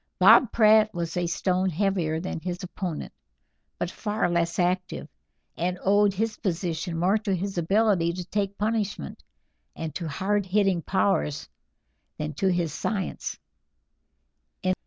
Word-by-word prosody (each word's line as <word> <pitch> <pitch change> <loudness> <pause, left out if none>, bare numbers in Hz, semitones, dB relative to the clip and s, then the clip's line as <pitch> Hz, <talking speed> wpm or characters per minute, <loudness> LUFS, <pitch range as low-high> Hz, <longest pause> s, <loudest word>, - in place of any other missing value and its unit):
Bob 250 - +7
Pratt 215 -1 +5
was 170 0 -3
a 175 -1 0
stone 185 +2 0
heavier 175 -3 0
than 175 -1 -4
his 180 +2 -5
opponent, 180 -3 -5 0.6
but - - -2
far 210 -3 -1
less 170 -1 0
active, 180 0 -1 0.5
and 180 +1 -1
owed 205 +1 +4
his 220 +2 -1
position 170 -2 -2
more 190 +6 +2
to 205 -3 -1
his 195 +2 -3
ability 195 -1 +2
to 180 0 -5
take 200 +1 -2
punishment, 210 - -2 0.5
and 160 -2 -5
to 170 +1 -4
hard 190 +6 -1
hitting 195 -2 +2
powers, 190 -6 0 0.7
than 150 0 -3
to 195 - 0
his 175 -4 0
science. 195 0 -3
185 Hz, 135 wpm, -26 LUFS, 170-205 Hz, 0.7 s, Bob